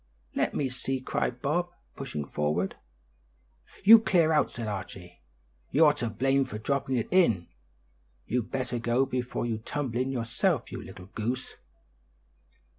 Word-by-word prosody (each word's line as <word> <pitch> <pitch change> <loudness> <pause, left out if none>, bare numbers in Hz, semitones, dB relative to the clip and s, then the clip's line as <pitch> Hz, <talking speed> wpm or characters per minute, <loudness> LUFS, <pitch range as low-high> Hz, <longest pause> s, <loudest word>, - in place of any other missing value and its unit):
"Let - - 0
me 140 - +1
see," 130 +1 -3
cried 125 -1 -2
Bob, 175 +5 +1 0.3
pushing 75 - -4
forward. 75 +7 -1 1.1
"You 225 +3 +10
clear 175 -7 +3
out," 150 - +3
said 115 -2 -5
Archie; 95 -3 -7 0.5
"you're 150 0 +5
to 120 - -3
blame 135 +5 +2
for 105 - -6
dropping 135 +3 -1
it 115 - -1
in; 115 - +3 0.8
you'd 120 -1 -1
better 125 -2 -2
go 120 +3 +2
before 125 -2 -2
you 115 -2 -2
tumble 125 +1 -3
in 130 +1 0
yourself, 120 -4 0
you - - -5
little 90 - -11
goose." 120 +4 -3
125 Hz, 140 wpm, -28 LUFS, 110-135 Hz, 1.1 s, You